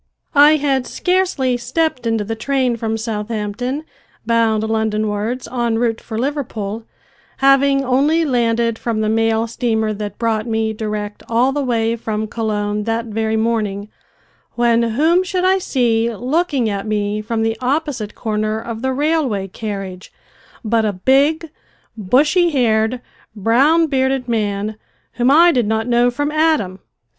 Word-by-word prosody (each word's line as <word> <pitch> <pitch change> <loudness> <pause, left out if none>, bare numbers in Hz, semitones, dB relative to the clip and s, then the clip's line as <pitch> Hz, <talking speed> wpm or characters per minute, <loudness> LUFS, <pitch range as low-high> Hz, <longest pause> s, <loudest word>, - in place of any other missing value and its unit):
I 295 +1 +7
had 275 -3 0
scarcely 360 -9 0
stepped 255 +1 -1
into 225 -2 0
the 220 +2 -4
train 255 +1 0
from 225 -1 -2
Southampton, 225 +4 -3 0.4
bound 225 -2 +2
Londonwards, 220 +2 -1
en 235 -2 0
route 230 -1 0
for 220 - -6
Liverpool, 230 -5 -3 0.5
having 275 0 +3
only 290 +6 +2
landed 235 -3 +1
from 225 -2 -2
the 215 - 0
mail 225 0 +1
steamer 220 -2 -1
that 205 -1 -6
brought 225 -1 -1
me 220 -1 -1
direct 210 -1 -4
all 240 +3 +2
the 290 +1 -1
way 230 -3 0
from 220 -2 -3
Colon 210 -2 -2
that 230 0 -1
very 220 0 -1
morning, 215 -3 -1 0.7
when 235 -1 +3
whom 300 +10 +2
should 370 0 -1
I 380 +1 +3
see 235 -8 +1
looking 265 - 0
at 200 0 -3
me 210 0 -1
from 225 +1 -2
the 225 0 0
opposite 260 -5 -2
corner 215 -1 -2
of 225 0 -6
the 265 +1 -1
railway 280 -9 0
carriage 195 -2 -6 0.5
but 225 +1 +2
a 210 -2 0
big, 285 - +2 0.4
bushy 295 - +3
haired, 235 -4 +1 0.3
brown 270 - +3
bearded 265 -3 0
man 210 -2 -2 0.3
whom 245 +2 +1
I 335 +5 +6
did 245 -8 +1
not 220 +1 0
know 240 0 +3
from 290 +4 -2
Adam. 305 - +1
230 Hz, 145 wpm, -18 LUFS, 220-270 Hz, 0.7 s, I